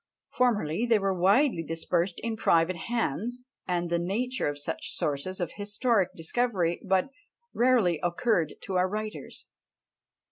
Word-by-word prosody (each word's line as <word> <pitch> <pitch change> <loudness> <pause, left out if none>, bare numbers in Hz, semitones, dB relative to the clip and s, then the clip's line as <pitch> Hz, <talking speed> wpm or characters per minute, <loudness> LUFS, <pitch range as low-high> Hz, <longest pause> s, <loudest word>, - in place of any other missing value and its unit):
Formerly 225 -5 +1
they 230 -2 +5
were 195 -1 0
widely 195 - +3
dispersed 170 +2 -1
in 230 -1 -2
private 170 -3 +3
hands; 235 - -2 0.2
and 175 -1 0
the 170 - +2
nature 230 +8 -1
of 145 - -4
such 145 - -4
sources 150 +6 -2
of 175 -3 -2
historic 205 -1 +1
discovery 175 -1 0
but 190 +5 +1 0.4
rarely 230 -10 +3
occurred 175 -2 +1
to 190 -2 -2
our 180 +1 +2
writers. 215 +1 -5
190 Hz, 135 wpm, -28 LUFS, 170-230 Hz, 0.4 s, they